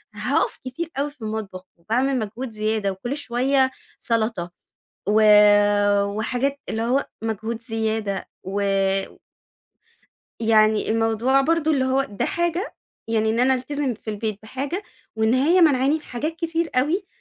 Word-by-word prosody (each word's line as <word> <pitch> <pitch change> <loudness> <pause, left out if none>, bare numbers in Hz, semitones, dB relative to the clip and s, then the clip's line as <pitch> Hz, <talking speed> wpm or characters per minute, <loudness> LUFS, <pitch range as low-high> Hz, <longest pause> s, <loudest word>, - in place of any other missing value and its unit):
هاقف - - 0
كتير 285 +7 -4
أوي 290 +1 -1
في 275 - -29
المطبخ 215 -4 -5
وباعمل 250 +9 0
مجهود 225 +4 -5
زيادة 215 -2 -1
وكل 240 +9 -5
شوية 265 0 +1 0.3
سلطة 220 -6 -1 0.6
و 215 +1 +4 0.8
وحاجات 250 +7 -2
اللي 220 - -2
هو 255 +4 +1 0.2
مجهود 225 +1 -3
زيادة 220 -3 -2
و 195 +2 -3 1.8
يعني 220 -1 +3
الموضوع 225 +4 +2
برضو 315 +2 +1
اللي 275 -4 +2
هو 260 +1 +2
ده 200 - -3
حاجة، 345 +5 -1 0.3
يعني 220 -1 +1
إن 230 - 0
أنا 260 +1 +4
ألتزم 270 0 -2
في 220 0 -7
البيت 210 -1 -3
بحاجة، 275 - -4 0.3
وإن 220 +2 +2
هي 320 +8 +4
مانعاني 280 -3 +4
من 315 - -3
حاجات 300 +5 -4
كتير 330 0 -2
أوي، 320 +10 +1
240 Hz, 135 wpm, -23 LUFS, 220-280 Hz, 1.8 s, و